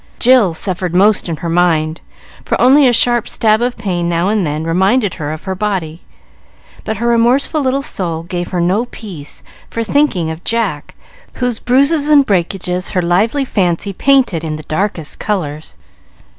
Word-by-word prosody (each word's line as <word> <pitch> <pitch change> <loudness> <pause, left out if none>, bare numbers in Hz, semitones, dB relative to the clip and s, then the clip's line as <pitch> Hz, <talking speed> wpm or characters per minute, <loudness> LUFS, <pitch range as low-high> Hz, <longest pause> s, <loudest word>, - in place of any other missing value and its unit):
Jill 240 -9 +4
suffered 180 -1 -3
most 200 0 +3
in 165 - -2
her - - 0
mind; 165 -2 +1 0.4
for - - -2
only 270 +2 +6
a - - +4
sharp 240 0 +2
stab 220 0 +2
of 245 0 -1
pain 175 -3 -2
now 170 +2 0
and 205 -5 0
then 150 +2 -3
reminded 190 +6 +1
her 150 -1 -5
of 155 0 -7
her 190 - -3
body; 185 -5 -3 0.8
but 220 -1 -3
her 235 - -3
remorseful 240 +6 +2
little 270 +1 0
soul 170 -9 -4
gave 175 0 -4
her 180 - -3
no 185 +7 +1
peace 185 -12 -10 0.3
for 230 - -3
thinking 220 - +1
of 160 +2 -8
Jack, 215 -11 -2 0.4
whose 245 -3 -2
bruises 280 +4 +2
and 290 -2 +5
breakages 180 -2 -1
her 180 - 0
lively 215 +11 +1
fancy 195 -3 -1
painted 255 - +2
in 155 -1 -3
the 155 - -8
darkest 165 -1 -3
colors. 155 - -4
195 Hz, 170 wpm, -15 LUFS, 170-240 Hz, 0.8 s, only